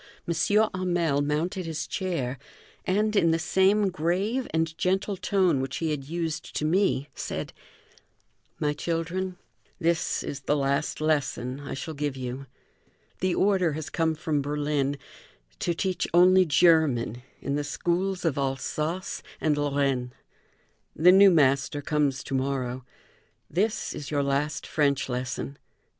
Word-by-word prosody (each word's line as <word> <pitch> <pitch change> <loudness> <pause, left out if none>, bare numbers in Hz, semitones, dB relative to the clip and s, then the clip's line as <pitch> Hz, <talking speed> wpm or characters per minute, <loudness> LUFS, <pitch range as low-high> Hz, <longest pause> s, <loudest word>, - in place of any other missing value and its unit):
Hamel 175 -4 +1
mounted 165 +5 -1
his 155 -2 -3
chair, 140 -9 -3 0.5
and, 210 +3 +1
in 170 -5 +4
the 165 - +3
same 190 +4 +3
grave 190 +9 -1
and 160 0 -1
gentle 195 +3 0
tone 185 -7 +2
which 135 - -3
he 160 -2 -1
had 140 -3 -3
used 165 +1 -4
to 155 - -1
me, 165 -4 +2
said: - - -5 1.1
"My 150 -1 +1
children, 175 +4 -2 0.4
this 170 -2 0
is 140 - -5
the 145 +2 0
last 140 +2 0
lesson 140 -4 0
I 145 - -6
shall 160 +4 -5
give 145 -2 -3
you. 130 +1 -5 0.7
The 185 -1 +1
order 190 -5 +2
has 155 0 -5
come 160 -1 +1
from 150 -1 -1
Berlin 145 -1 -1 0.6
to 175 - 0
teach 185 +1 -1
only 185 +1 +7
German 150 -8 +3 0.2
in 140 - -3
the 145 - -1
schools 180 +5 -1
of 145 -4 +1
Alsace 150 +6 -2 0.2
and 155 -2 +2
Lorraine. 140 -4 0 0.8
The 175 +4 +6
new 195 +1 +8
master 145 -3 +3
comes 145 -2 0
to - - -6
morrow. 130 -1 -1 0.7
This 210 +5 0
is 140 -4 -6
your 145 -1 +1
last 140 +2 -1
French 140 -3 +1
lesson. 130 +2 -4
155 Hz, 135 wpm, -27 LUFS, 140-180 Hz, 1.1 s, new